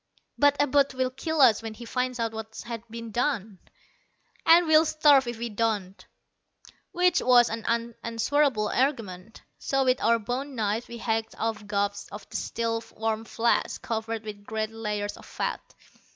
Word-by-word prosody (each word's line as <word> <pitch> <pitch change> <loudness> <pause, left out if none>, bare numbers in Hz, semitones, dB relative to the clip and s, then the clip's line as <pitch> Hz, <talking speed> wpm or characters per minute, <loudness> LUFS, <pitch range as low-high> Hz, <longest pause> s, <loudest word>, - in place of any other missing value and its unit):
"But 285 0 +4
Abud 280 -1 +3
will 255 0 0
kill 315 +4 -1
us 230 -5 +6
when 225 -1 -6
he 235 - -10
finds 250 +1 -2
out 230 -1 -1
what's 220 0 -7 0.3
been 230 0 -7
done." 220 -5 -1 0.9
"And 340 +1 +7
we'll 315 0 +6
starve 290 -5 +4
if 240 -1 -4
we 235 +1 -3
don't." 205 -3 -2 0.9
Which 360 0 +3
was 245 -1 +5
an 225 0 -4
unanswerable 230 +1 0
argument. 225 -7 -2 0.2
So 270 0 0
with 255 0 +2
our 230 - +4
bone 255 +6 -4
knives 220 +1 -1
we 235 - -8
hacked 225 -1 -2
off 220 -2 -3
gobs 200 0 -2
of 205 +1 -9
the - - -10
still 230 0 -2
warm 220 0 -2
flesh, 235 +1 0
covered 225 0 -4
with 210 -2 -8
great 220 +1 -3
layers 210 -2 -3
of - - -14
fat. - - -3
230 Hz, 160 wpm, -27 LUFS, 220-260 Hz, 0.9 s, And